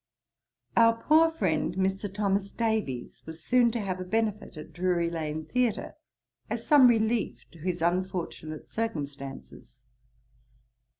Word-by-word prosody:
Our 230 0 +6
poor 315 +5 +5
friend, 180 - -1
Mr. 190 +1 -1
Thomas 200 -1 0
Davies, 220 - -2
was 160 0 -9
soon 245 -1 +4
to 235 - -1
have 185 -2 -3
a - - -3
benefit 215 -1 -2
at 155 - -10
Drury 175 -1 0
lane 155 -1 -3
theatre, 250 -3 -1 0.6
as - - -3
some 290 -4 +7
relief 225 -1 +1
to 170 - -16
his 175 +1 -2
unfortunate 175 -3 -2
circumstances. 140 - -6
190 Hz, 125 wpm, -28 LUFS, 165-225 Hz, 0.6 s, some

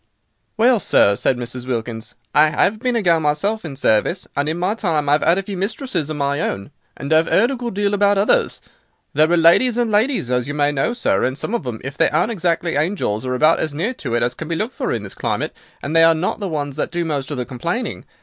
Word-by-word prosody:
"Well, 235 +1 +4
sir," 100 - +3
said 125 +4 0
Mrs. 125 +1 -4
Wilkins, 115 -2 -4 0.2
"I 150 +1 +5
'ave 205 +3 -1
been 245 +2 -1
a 230 - 0
gal 170 -3 +3
myself 160 +9 0
in 155 -5 -6
service; 135 - +1
and 145 +2 0
in 160 - -2
my 180 +4 0
time 165 -9 -1
I've 145 +1 +3
'ad 170 +3 +3
a 195 - -1
few 195 0 -6
mistresses 195 - -3
of 155 - -4
my 140 0 -1
own, 100 -3 -3 0.3
and 140 +3 -2
I've 160 +1 +4
'eard 235 +6 +3
a - - -2
good 240 -4 -5
deal 205 0 0
about 205 0 +3
others. 200 +2 +1 0.5
There 155 +2 +3
are 175 - +4
ladies 175 +9 +4
and 240 -2 +1
ladies, 215 - +1
as 125 0 0
you 145 - -4
may 145 0 +2
know, 145 - -1
sir, 95 - +1
and 130 +1 -1
some 210 - -4
of 235 - 0
them, 120 -3 -4
if 135 +2 -7
they 165 - +4
aren't 235 - +1
exactly 170 -5 -1
angels, 145 - -1
are 125 - -1
about 155 +5 +3
as 155 -2 -2
near 195 - -1
to 125 - -4
it 120 - +1
as 120 +1 0
can 160 +5 -7
be 165 - -2
looked 220 +9 -3
for - - -3
in - - -2
this - - -9
climate, - - -3 0.3
and 150 +3 -3
they 165 - +6
are 165 0 +6
not 175 +7 -2
the 200 -3 -3
ones 145 -3 -4
that - - -1
do 175 0 -2
most 145 -4 -3
of 145 - -4
the 125 - -2
complaining. 170 - -4
160 Hz, 255 wpm, -20 LUFS, 140-205 Hz, 0.5 s, they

